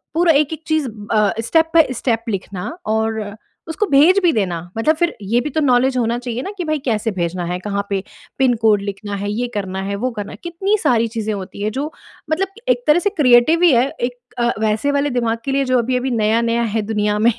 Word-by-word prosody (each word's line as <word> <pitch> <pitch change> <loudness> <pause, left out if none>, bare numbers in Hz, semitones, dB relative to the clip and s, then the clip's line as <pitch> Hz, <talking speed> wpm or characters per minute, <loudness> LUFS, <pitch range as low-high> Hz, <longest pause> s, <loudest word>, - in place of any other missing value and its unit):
पूरा 335 -1 +4
एक-एक 315 +2 -2
चीज़ 315 -4 +1 0.2
अ, 210 -2 +3
step 325 +7 +2
by 325 -2 +6
step 230 -1 -1
लिखना 190 -2 -4 0.3
और 220 0 0 0.5
उसको 325 +6 0
भेज 315 +8 +6
भी 335 -3 +4
देना। 180 -6 -1 0.2
मतलब 305 +8 +2
फिर 345 +1 0
ये 230 +5 +1
भी 300 - -3
तो 315 - 0
नॉलेज 255 -1 +3
होना 235 0 +1
चाहिए 245 0 -4
ना 395 - -5
कि 360 - -2
भाई, 310 -1 -1
कैसे 225 -2 0
भेजना 175 -1 -2
है? 180 +1 -3
कहाँ 200 +1 -3
पे 195 -1 -1 0.4
पिन 255 -2 +4
कोड 210 -2 +4
लिखना 200 0 -5
है? 205 +1 -3
ये 245 +3 -2
करना 190 -1 -3
है, 200 +1 -3
वो 250 +5 -2
करना 205 -3 -6
है। - - -10
कितनी 385 +5 0
सारी 230 -5 +3
चीज़ें 220 -1 -2
होती 200 0 -7
हैं, 215 - 0
जो 285 +6 -3 0.4
मतलब 390 +6 -1
एक - - +2
तरह 300 +4 +5
से 405 - +1
क्रिएटिव 255 +7 +5
ही 345 - +7
है, 245 +3 +3
एक 245 0 -2 0.2
अ, 240 0 +2
वैसे 220 +6 +1
वाले 285 0 +1
दिमाग 230 0 0
के 270 - -1
लिए, 275 0 +1
जो 255 -1 +2
अभी-अभी 250 +2 -1
नया-नया 230 +1 +1
है 220 - +2
दुनिया 210 0 +1
में। 235 +3 +4
240 Hz, 225 wpm, -19 LUFS, 210-295 Hz, 0.5 s, ही